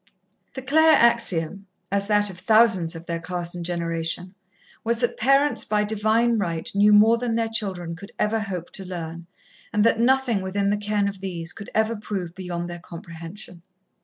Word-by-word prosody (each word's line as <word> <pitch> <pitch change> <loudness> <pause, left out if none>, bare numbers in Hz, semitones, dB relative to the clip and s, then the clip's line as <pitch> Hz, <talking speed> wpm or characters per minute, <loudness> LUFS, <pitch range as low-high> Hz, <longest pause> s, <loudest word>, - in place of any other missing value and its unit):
The 265 - -6
Claire 315 +4 +5
axiom, 200 -5 +2 0.2
as 200 0 0
that 205 -1 +2
of 180 - -12
thousands 215 -6 +3
of 165 +1 -9
their 170 -1 -3
class 175 0 -2
and 175 -1 -5
generation, 170 +1 -3 0.5
was 235 +1 0
that 240 +1 -1
parents 275 +4 +3
by 210 0 0
Divine 220 +2 +1
right 170 -4 -3
knew 205 +1 +4
more 220 +3 +6
than 235 -2 -1
their 230 -1 0
children 185 -7 -2
could 200 +4 -12
ever 220 +1 +1
hope 185 -5 -5
to 195 - -3
learn, 170 -2 -7 0.4
and 210 0 +2
that 225 0 +3
nothing 250 -3 +2
within 195 +1 -1
the 205 - +1
ken 205 -1 0
of 195 -1 -6
these 175 -3 -4
could 200 - -9
ever 220 +1 +1
prove 195 -5 -5
beyond 175 -2 -5
their 175 0 -7
comprehension. 170 +2 -10
200 Hz, 180 wpm, -24 LUFS, 175-225 Hz, 0.5 s, more